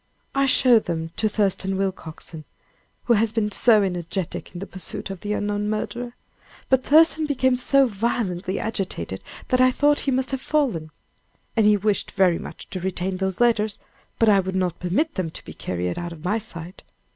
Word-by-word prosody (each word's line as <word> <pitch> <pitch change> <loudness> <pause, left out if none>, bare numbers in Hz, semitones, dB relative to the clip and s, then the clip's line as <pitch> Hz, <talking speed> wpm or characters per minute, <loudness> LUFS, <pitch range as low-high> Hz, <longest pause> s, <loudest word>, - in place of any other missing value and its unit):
"I 275 0 +2
showed 250 -3 +5
them 165 -1 -3
to 215 - +1
Thurston 195 -2 0
Willcoxen, 165 -4 -5 0.6
who 240 - +3
has 220 0 +2
been 220 -2 0
so 215 0 +5
energetic 180 -1 -3
in - - -9
the 195 - -5
pursuit 190 0 -4
of 195 - -7
the 210 +2 -3
unknown 205 0 -1
murderer; 235 +3 -4 0.5
but 260 -1 +3
Thurston 315 +1 +5
became 260 -3 +2
so 270 +2 +4
violently 200 -4 -2
agitated 180 - -3 0.3
that 255 0 +3
I 255 - +6
thought 290 +3 +2
he - - -2
must 260 +1 0
have 265 -1 -2
fallen. 250 - 0 0.7
And 220 -2 +4
he 210 -1 +5
wished 205 0 0
very 185 -4 +3
much - - -9
to 185 - -4
retain 185 +1 -2
those 190 -1 -2
letters, 220 -3 +2 0.4
but 225 - +3
I 205 -2 +6
would 190 0 -3
not 180 -2 -1
permit 215 - 0
them 185 -4 -2
to - - -11
be - - -9
carried 90 0 -3
out 175 0 -5
of 165 +1 -12
my 210 +5 +1
sight. 180 -4 -9
205 Hz, 185 wpm, -23 LUFS, 180-240 Hz, 0.7 s, I